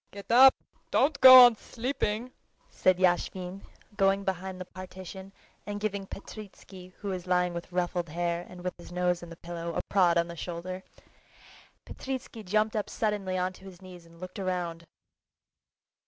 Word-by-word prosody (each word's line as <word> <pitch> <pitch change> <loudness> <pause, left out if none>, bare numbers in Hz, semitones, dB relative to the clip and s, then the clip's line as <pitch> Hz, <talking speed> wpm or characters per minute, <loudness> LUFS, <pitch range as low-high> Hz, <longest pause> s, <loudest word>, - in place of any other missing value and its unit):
"Get 200 +2 -9
up, 260 +3 +8 0.3
don't 275 0 +1
go 255 -1 +12
on 240 -2 +4
sleeping," 245 -1 -3 0.4
said 185 -1 +2
Yashvin, 180 +1 0 0.4
going 195 0 +2
behind 190 0 -4
the 185 - -6
partition 185 +1 -10 0.4
and 205 0 -4
giving 200 -2 -3
Petritsky, 195 -3 -11
who 205 - -6
was 185 -1 -5
lying 180 -1 +1
with 170 +1 -7
ruffled 175 -1 -2
hair 170 +1 -2
and 180 -1 -11
with 180 -1 -3
his 175 - -12
nose 180 0 0
in 175 - -10
the 165 - -10
pillow, 170 -1 -6
a - - 0
prod 180 -4 +3
on 170 0 +2
the 170 - -8
shoulder. 180 +2 -6 1.0
Petritsky 260 -3 -6
jumped 215 +2 0
up 210 - -2
suddenly 205 -4 -2
onto 185 +1 -3
his 185 -2 -12
knees 180 -3 -13
and 165 0 -19
looked 185 +2 -8
round. 175 -3 -3
185 Hz, 160 wpm, -28 LUFS, 175-205 Hz, 1.0 s, go